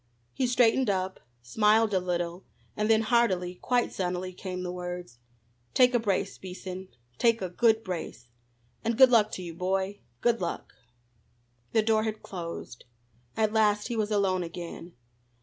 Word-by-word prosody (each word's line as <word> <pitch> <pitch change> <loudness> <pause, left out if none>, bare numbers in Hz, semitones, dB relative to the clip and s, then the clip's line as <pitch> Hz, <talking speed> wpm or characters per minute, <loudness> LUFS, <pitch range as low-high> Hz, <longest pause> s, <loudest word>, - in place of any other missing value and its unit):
He 260 - 0
straightened 245 0 +3
up, 190 -1 -1 0.2
smiled 215 - +3
a 190 - +3
little, 175 0 -3 0.3
and 210 +1 0
then 220 0 +5
heartily, 185 -6 +1
quite 245 -1 +1
sunnily, 185 0 -3
came 185 -1 -5
the 180 - -3
words: 180 -8 -6 0.6
"Take 250 -1 +6
a 240 - +4
brace, 200 -3 -1
Beason 185 0 -7 0.3
take 230 -1 +4
a 185 - -3
good 225 +4 +3
brace. 175 - -6 0.6
And 230 0 0
good 260 -1 +8
luck 215 -3 +4
to 185 - -4
you, 170 -1 -6
boy 190 +3 -1 0.2
good 235 -3 +2
luck." 170 - -4 1.0
The 220 - +4
door 220 0 +3
had 215 0 -3
closed. 170 -9 -7 0.5
At 215 -1 +1
last 210 0 +2
he 240 - -2
was 215 -1 0
alone 195 -3 +1
again. 170 0 -7
195 Hz, 155 wpm, -28 LUFS, 180-225 Hz, 1.0 s, good